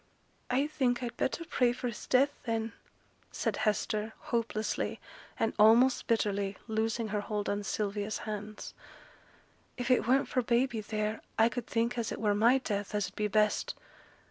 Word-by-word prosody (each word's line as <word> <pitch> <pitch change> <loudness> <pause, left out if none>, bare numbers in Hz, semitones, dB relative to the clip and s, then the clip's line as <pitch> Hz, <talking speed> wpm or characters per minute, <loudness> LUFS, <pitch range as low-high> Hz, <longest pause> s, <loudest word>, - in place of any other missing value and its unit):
'I 265 +3 +2
think 255 -5 0
I'd 235 -1 -4
better 335 +7 -1
pray 250 -6 +2
for 250 - -6
his 235 - -6
death, 275 +3 +3
then,' 225 0 -1 0.6
said - - -1
Hester, 215 0 0
hopelessly, 230 -2 -2 0.4
and 225 - +1
almost 235 +4 +6
bitterly, 200 -3 0
loosing 220 0 -1
her 210 0 -1
hold 205 0 -3
of 205 0 -1
Sylvia's 205 0 -2
hands. 210 0 -6 1.0
'If 245 0 -1
it 250 - +3
weren't 265 +3 +3
for 255 - +1
baby 240 -1 +1
theere, 215 0 -2 0.2
I 225 +1 +5
could 240 -1 -5
think 235 +1 0
as 230 - -2
it - - -4
were 210 -2 +2
my 230 +5 +5
death 210 -5 -3
as 205 -3 0
'ud - - -25
be 210 - 0
best. 210 +1 +1
225 Hz, 165 wpm, -31 LUFS, 210-245 Hz, 1.0 s, almost